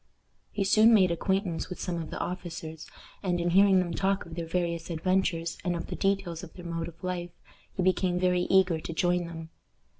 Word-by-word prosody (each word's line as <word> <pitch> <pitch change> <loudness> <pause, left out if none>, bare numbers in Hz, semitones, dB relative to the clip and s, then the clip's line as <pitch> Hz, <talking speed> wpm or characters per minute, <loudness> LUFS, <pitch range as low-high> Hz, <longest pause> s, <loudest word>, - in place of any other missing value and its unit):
He 200 - -1
soon 215 +3 +6
made 185 -4 +4
acquaintance 190 0 -1
with 180 - -7
some 170 -2 -2
of 155 - -7
the - - -5
officers, 165 -3 -6 0.3
and, 180 -3 0
in 175 0 0
hearing 195 +1 +6
them 180 -2 +1
talk 195 +3 0
of 170 - -10
their 165 0 -4
various 170 -1 -2
adventures, 170 0 0
and 175 -1 0
of 170 - -4
the - - -5
details 195 -4 -1
of 170 - -10
their 180 - -10
mode 165 -1 -3
of 170 0 -13
life, 180 -1 -3 0.5
he 185 - +1
became 180 0 +2
very 180 -1 +2
eager 185 -4 +4
to 165 - -6
join 175 +1 +1
them. 165 -1 -8
175 Hz, 205 wpm, -28 LUFS, 170-185 Hz, 0.5 s, soon